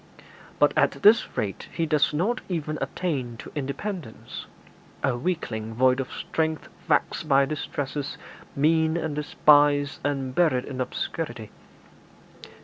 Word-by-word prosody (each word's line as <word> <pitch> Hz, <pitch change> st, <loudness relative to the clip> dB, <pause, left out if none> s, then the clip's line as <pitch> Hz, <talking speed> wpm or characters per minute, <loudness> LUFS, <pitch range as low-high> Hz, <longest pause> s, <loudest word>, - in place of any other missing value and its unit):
But -, -, +4 dB
at -, -, +1 dB
this 215 Hz, +3 st, +5 dB
rate 100 Hz, -2 st, -3 dB
he 165 Hz, -, -1 dB
does 150 Hz, -2 st, +2 dB
not 195 Hz, +11 st, 0 dB
even 155 Hz, -3 st, -2 dB
attain 130 Hz, -10 st, -2 dB
to -, -, -10 dB
independence 145 Hz, -, -5 dB, 0.6 s
a 135 Hz, -3 st, +2 dB
weakling 120 Hz, -7 st, -3 dB
void 130 Hz, +2 st, +4 dB
of 135 Hz, -, -3 dB
strength, 160 Hz, -1 st, -2 dB, 0.2 s
vexed 160 Hz, -, +1 dB
by 140 Hz, 0 st, +5 dB
distresses, 145 Hz, -1 st, -4 dB, 0.4 s
mean 160 Hz, +3 st, +3 dB
and 160 Hz, -3 st, -2 dB
despised, 145 Hz, -1 st, +4 dB
and 135 Hz, -3 st, -1 dB
buried 135 Hz, -6 st, +2 dB
in 130 Hz, -2 st, -4 dB
obscurity. 120 Hz, -4 st, -4 dB
145 Hz, 125 wpm, -26 LUFS, 130-160 Hz, 0.6 s, this